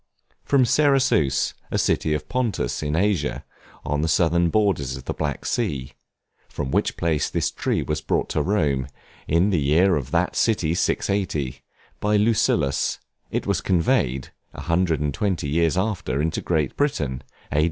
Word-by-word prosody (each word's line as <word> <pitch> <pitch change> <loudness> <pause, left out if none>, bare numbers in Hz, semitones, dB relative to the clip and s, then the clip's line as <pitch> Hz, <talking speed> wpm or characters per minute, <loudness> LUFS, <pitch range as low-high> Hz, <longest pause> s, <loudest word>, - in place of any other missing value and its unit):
From 135 -3 +3
Cerasus, 130 - +2 0.2
a - - -1
city 75 - +1
of 75 - -5
Pontus, 125 -5 -1
in 75 0 -1
Asia, 95 -4 0 0.4
on 75 0 -1
the 80 - 0
southern 85 +1 +2
borders 85 -11 +1
of 65 - -11
the - - -2
Black - - -3
Sea; 75 - -2 0.6
from 65 -2 -4
which - - 0
place 80 -3 0
this - - -1
tree - - -1
was 75 0 -2
brought - - 0
to 75 - 0
Rome, 75 -8 0 0.4
in 85 +6 +3
the 85 -5 +1
year 85 +7 +4
of 70 -5 -3
that 90 +1 0
city 90 -8 +1
680, 75 -8 -1 0.4
by 105 0 +2
Lucullus; 105 -10 +1 0.3
it - - -2
was - - 0
conveyed, 70 -7 +1 0.3
a - - -7
hundred 85 -3 +1
and 75 -2 -1
twenty 90 -3 -1
eight - - -2
years 85 +1 +2
after, 95 -10 -1
into 80 +2 -1
Great 80 -6 0
Britain, 70 - -1 0.3
A. 75 - +1
80 Hz, 165 wpm, -23 LUFS, 75-100 Hz, 0.6 s, year